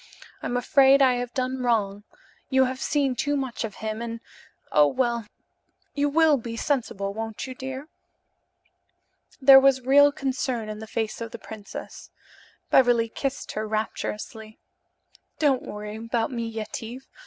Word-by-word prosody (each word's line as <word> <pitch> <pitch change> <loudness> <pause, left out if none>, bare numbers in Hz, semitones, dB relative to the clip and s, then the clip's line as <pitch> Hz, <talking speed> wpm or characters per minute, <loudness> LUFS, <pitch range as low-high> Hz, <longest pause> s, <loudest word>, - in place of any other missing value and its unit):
I'm 245 - -2
afraid 270 +2 +5
I 255 -2 +4
have 245 0 -4
done 255 0 -1
wrong. 210 -4 0 0.4
You 265 -1 +4
have 260 +1 -4
seen 280 -4 +1
too 290 +4 0
much 260 -4 -3
of 215 -3 -5
him 220 +1 -3
and 230 0 -5 0.5
oh, 150 -1 +6
well, 235 - -1 0.7
you 290 0 +1
will 310 0 +4
be 230 -1 -6
sensible, 225 -8 -1
won't 225 +2 -5
you, 260 - -6
dear?" 265 +2 -7 1.5
There 270 -1 +9
was 270 -1 +4
real 285 +3 +6
concern 260 -5 -2
in 215 0 -6
the 220 - -8
face 220 0 -3
of 230 - -4
the 235 - -8
princess. 215 -2 -9 0.6
Beverly 240 -3 +4
kissed 275 +4 -4
her 215 0 -3
rapturously. 215 0 -4 0.8
"Don't 280 -4 +2
worry 210 +1 -7
about 230 +2 -2
me, 235 -2 -3
Yetive. 225 +3 -6
245 Hz, 145 wpm, -25 LUFS, 220-265 Hz, 1.5 s, There